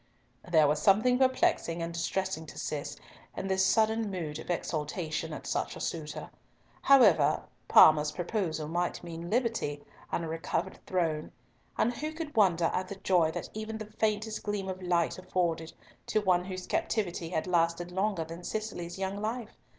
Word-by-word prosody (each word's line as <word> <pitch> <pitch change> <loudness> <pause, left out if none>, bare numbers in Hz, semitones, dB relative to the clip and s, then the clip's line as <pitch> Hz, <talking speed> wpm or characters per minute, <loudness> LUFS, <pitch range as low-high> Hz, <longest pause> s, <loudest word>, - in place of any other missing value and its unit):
There 155 -3 +6
was 150 +1 +1
something 225 +8 +4
perplexing 260 - +2
and 170 0 -4
distressing 170 -1 -2
to - - -11
Cis 145 -2 -4 0.4
in 195 - -3
this 190 0 +2
sudden 220 +2 +2
mood 160 -5 -4
of - - -10
exultation 160 -1 -2
at - - -7
such - - -2
a - - -8
suitor. 155 -3 -4 0.5
However, 185 - +5 0.2
Parma's 150 -1 +7
proposal 170 -3 -2
might 175 +3 -2
mean 170 0 -6
liberty 225 - -1 0.3
and 170 - -1
a - - -4
recovered 165 +1 -3
throne, 165 -4 -1 0.5
and 240 - +2
who 305 +5 -4
could 315 -3 -6
wonder 175 -6 +4
at 185 0 -1
the 200 - -6
joy 180 -4 +2
that - - -5
even 220 +1 -5
the 215 - -6
faintest 215 0 0
gleam 205 -2 -3
of 190 0 -5
light 175 -1 +1
afforded 170 -3 -1 0.4
to 215 - +2
one 180 -3 +2
whose 185 -1 -5
captivity 175 -6 -1
had 160 -3 -1
lasted 175 0 +1
longer 190 -2 0
than 165 +2 -9
Cicely's 195 -5 -4
young 195 +1 -3
life? 225 +1 -4
180 Hz, 165 wpm, -30 LUFS, 165-215 Hz, 0.5 s, Parma's